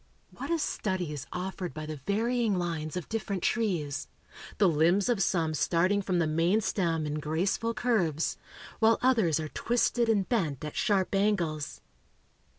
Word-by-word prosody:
What - - -7
a 335 - +2
study 185 - -2
is 145 - -6
offered 180 -1 -4
by 155 0 -5
the 155 0 -5
varying 225 0 +1
lines 165 -2 -3
of 180 - -5
different 205 -4 -3
trees 170 - -1 0.5
the 205 - +5
limbs 170 +6 +3
of 235 -5 +1
some 165 -4 +1
starting 185 +6 +2
from 185 -2 -1
the 170 - +2
main 165 +6 +2
stem 165 -6 0
in 150 0 -2
graceful 185 +9 -1
curves, 180 -11 +1 0.4
while 225 0 +5
others 220 - +3
are 155 -1 -4
twisted 240 +2 +1
and 200 -4 +2
bent 160 - -1
at 150 - -6
sharp 195 -2 +1
angles. 180 -7 0
185 Hz, 155 wpm, -29 LUFS, 160-215 Hz, 0.5 s, the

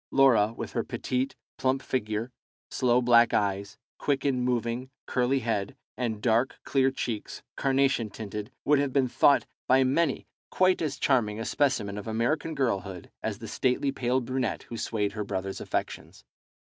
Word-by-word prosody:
Laura, 120 -6 +5
with - - -5
her - - -1
petite, 130 +2 -2 0.2
plump 130 +1 +1
figure, 110 -1 -2 0.4
sloe 125 -1 +2
black 120 -1 +5
eyes, 100 0 -1 0.2
quick 140 -1 0
in 130 -3 +1
moving, 125 +1 -1 0.2
curly 130 +1 +1
head, 105 -4 -2 0.2
and 110 -3 -3
dark, 120 +2 +2
clear 135 -1 +2
cheeks, 120 -5 -5
carnation 135 -4 +2
tinted, 105 +2 -6
would 145 -1 +4
have 140 -1 0
been 135 -1 +2
thought 140 +3 +4 0.2
by 130 +1 +5
many 140 +3 +1 0.2
quite 185 0 +3
as 145 -4 -2
charming 110 -6 +1
a 115 - -3
specimen 105 -8 0
of 105 - -9
American 125 +8 -1
girlhood 100 - -2
as - - -3
the - - -8
stately 130 +2 0
pale 130 -1 0
brunette 130 0 -2
who 120 - -8
swayed 105 -2 -1
her 105 +1 -4
brother's 95 -1 -4
affections. - - -4
125 Hz, 160 wpm, -28 LUFS, 110-135 Hz, 0.4 s, Laura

